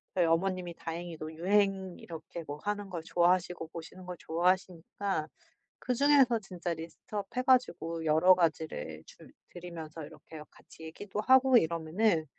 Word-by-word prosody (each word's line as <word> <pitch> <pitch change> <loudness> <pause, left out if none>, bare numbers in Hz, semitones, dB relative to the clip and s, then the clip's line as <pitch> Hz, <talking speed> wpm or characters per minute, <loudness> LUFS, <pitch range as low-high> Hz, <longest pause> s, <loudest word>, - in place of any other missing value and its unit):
저희 180 -2 +4
어머님이 175 +1 0
다행히도 165 -1 -6
유행 195 +1 +1
이렇게 165 0 -8
뭐 145 - -5
하는 205 -1 -3
걸 170 -3 -5
좋아하시고 175 0 +1
보시는 170 +3 -10
걸 180 - -5
좋아하시니까 180 0 -1 0.5
그중에서 260 -1 +4
진짜 180 -4 -4
리스트업 170 +5 -6
해 255 - +1
가지고 170 -11 +1
여러 160 +4 +6
가지를 155 - -1
줄 - - -15 0.2
드리면서 165 -3 -8
이렇게 160 +2 -12
같이 160 - -16
얘기도 195 +6 -5
하고 260 +1 +6
이러면은 165 +1 +1
175 Hz, 350 characters per minute, -31 LUFS, 160-195 Hz, 0.5 s, 여러